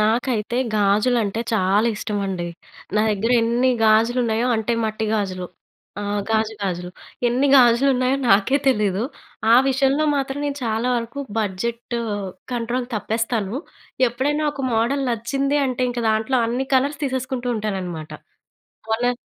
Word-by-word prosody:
నాకైతే 230 +1 0 0.2
గాజులంటే 210 +1 +2
చాలా 205 +2 +2
ఇష్టమండి. 195 -5 -3 0.5
నా - - +4
దగ్గర 215 +4 0
ఎన్ని 240 +3 +2 0.2
గాజులు 225 +3 +4
ఉన్నాయో, 225 +1 0
అంటే 220 +2 -1
మట్టి 220 0 -2
గాజులు. 185 -4 -2 0.5
ఆ! - - -4 0.3
గాజు 220 0 +1
గాజులు. 180 -2 -3 0.4
ఎన్ని 260 +4 +2
గాజులున్నాయో 255 +1 +4
నాకే 210 +8 +4
తెలీదు. 210 -5 +1 0.5
ఆ - - +8
విషయంలో 270 +3 +2
మాత్రం 270 0 -2
నేను 285 -1 -2
చాలా 225 +2 0
వరకు 235 +4 -4 0.2
బడ్జెట్ 230 +4 -3 0.6
కంట్రోల్ 240 +1 -2
తప్పేస్తాను. 220 0 -1 0.5
ఎప్పుడైనా 285 +6 -1
ఒక 275 - -6
మోడల్ 270 +5 +1
నచ్చింది 270 +5 0
అంటే, 255 -1 -2
ఇంక 240 0 -3
దాంట్లో 220 +4 +1
అన్ని 245 +3 -2
కలర్స్ 285 +3 +1
తీసేసుకుంటూ 260 -2 -2
ఉంటాననమాట. 185 -7 -4 0.8
మొన్న 245 +2 +1
230 Hz, 125 wpm, -22 LUFS, 215-255 Hz, 0.8 s, ఆ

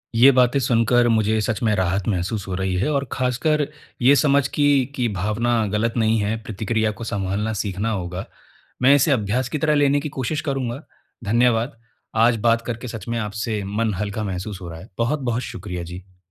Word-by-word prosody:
ये 125 +4 +8
बातें 125 +1 +3
सुनकर 120 -1 +3
मुझे 110 -1 +2
सच 105 -1 -2
में 110 -2 +3
राहत 95 0 0
महसूस 95 +1 -2
हो 95 - -4
रही 95 0 -1
है 110 +11 0
और 140 -1 0
ख़ासकर 135 +4 0 0.3
ये 130 +4 +6
समझ 140 -1 +3
कि, 145 -3 +3
कि 125 -2 0
भावना 110 +4 0
गलत 110 +3 0
नहीं 110 0 +3
है, 105 +2 0
प्रतिक्रिया 110 +1 -1
को 105 +2 -9
संभालना 105 0 -2
सीखना 100 +1 -2
होगा। 90 -2 -4 0.6
मैं 130 +2 +6
इसे 145 +2 +3
अभ्यास 125 +2 0
की - - -2
तरह 150 +1 +2
लेने 145 0 +3
की 150 - -4
कोशिश 135 +3 -2
करूँगा, 135 -3 -3 0.4
धन्यवाद, 120 +3 +2 0.4
आज 115 +1 +4
बात 115 0 +3
करके 120 +1 -4
सच 115 -1 -7
में 115 0 -1
आपसे 105 0 -3
मन 110 -2 +1
हल्का 105 +1 -3
महसूस 95 0 -5
हो 85 - -7
रहा 80 -1 -8
है। 95 - -13
बहुत-बहुत 120 -1 0
शुक्रिया 90 -6 -6
जी। 90 +2 -10
115 Hz, 190 wpm, -22 LUFS, 100-125 Hz, 0.6 s, ये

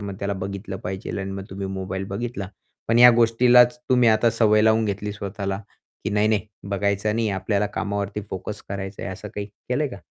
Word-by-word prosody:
मग 100 -1 -5
त्याला 100 0 -2
बघितलं 100 0 -5
पाहिजे." 95 +2 -4
आणि 95 0 -4
मग 95 0 -5
तुम्ही 95 +1 -4
मोबाईल 95 0 -4
बघितला. 115 -3 -4 0.4
पण 115 - +4
ह्या 125 0 +10
गोष्टीलाच 120 +3 +5
तुम्ही 125 -2 +5
आता 110 +1 +4
सवय 110 -1 +4
लावून 110 0 +4
घेतली 105 0 -2
स्वतःला 100 -1 -4 0.4
की - - -1
"नाही, 105 +1 +2
नाही 110 -1 +1 0.2
बघायचं 100 +1 0
नाही 115 -1 +1
आपल्याला 100 +2 0
कामावरती 100 0 -2
फोकस 100 +3 -5
करायचा 95 0 -5
आहे." 95 - -4
असं 105 +3 -8
काही 100 0 -4
केलंय 125 +8 -3
का? 125 - -8
105 Hz, 190 wpm, -23 LUFS, 100-115 Hz, 0.4 s, ह्या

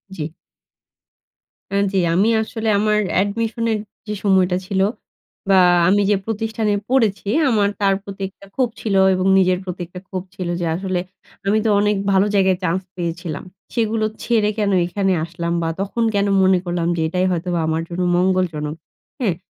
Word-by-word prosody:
জি। 155 -3 -4 1.5
N 200 - +3
জ্বী। 195 - +1 0.2
আমি 200 +5 +3
আসলে, 220 0 -3
আমার 210 0 +2 0.2
admission 225 +3 -2
এর 215 - -1 0.3
যে 210 - -2
সময়টা 185 -2 +3
ছিল 190 0 0 0.7
বা 190 - +6 0.3
আমি 205 +2 +4
যে 205 - +4
প্রতিষ্ঠানে 220 -1 -1 0.2
পড়েছি, 225 -7 +1 0.2
আমার 205 -3 +2
তার 195 -1 +4
প্রতি 200 -1 -9
একটা 200 - -18
ক্ষোভ 255 -3 +1
ছিল 210 -3 -1 0.2
এবং 185 0 0
নিজের 185 -1 +3
প্রতি 180 -1 -6
একটা 180 +1 -9
ক্ষোভ 185 -2 -4
ছিল 185 -2 -4
যে, 175 - -1
আসলে 185 0 -2 0.5
আমি 215 +2 +3
তো - - +3
অনেক 210 0 +2 0.2
ভালো 195 +1 +4
জায়গায় 190 -2 +3
চান্স 180 +1 0
পেয়েছিলাম। 170 -2 -4 0.3
সেগুলো 225 -2 0 0.2
ছেড়ে 220 -3 +2
কেন 205 -2 +1
এখানে 195 +2 0
আসলাম 170 0 -3
বা 165 - 0
তখন 205 +4 -1
কেন 200 0 +2 0.2
মনে 190 0 +5
করলাম 175 -1 -1
যে 165 - -2
এটাই 180 +3 0
হয়তোবা 175 0 -1
আমার 160 0 0
জন্য 175 +1 -3 0.2
মঙ্গলজনক? 175 -5 0 0.4
হ্যাঁ? 205 -10 0
190 Hz, 165 wpm, -20 LUFS, 180-210 Hz, 1.5 s, বা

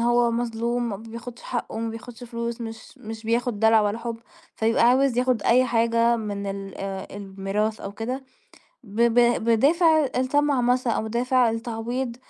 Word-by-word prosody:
هو 240 0 +3
مظلوم، 235 +1 -1
ما 200 - -3
بياخدش 230 +3 -9
حقّه، 240 -2 -4
ما 230 - -2
بياخدش 240 +1 -9
فلوس، 235 0 -4
مش 225 -1 -8
مش 220 0 -8
بياخد 230 -1 0
دلع 220 0 +5
ولا 210 +2 0
حُب، 230 -1 -5 0.4
فيبقى 225 +1 +2
عاوز 260 -1 +3
ياخد 250 -3 +1
أي 255 +2 +4
حاجة 230 0 +2
من 205 -3 -4
ال 195 -1 -5
آآ 195 0 -4
الميراث 200 +2 -3
أو 195 - -6
كده، 250 +6 -4 0.6
ب 215 +1 -3
ب 235 0 +4 0.2
بِدافع 310 +7 +4
الطمع 280 +1 +2
مث 250 +1 +1
أو 225 - +1
بِدافع 245 +2 +2
التعويض 235 +2 -3
235 Hz, 160 wpm, -24 LUFS, 220-245 Hz, 0.6 s, دلع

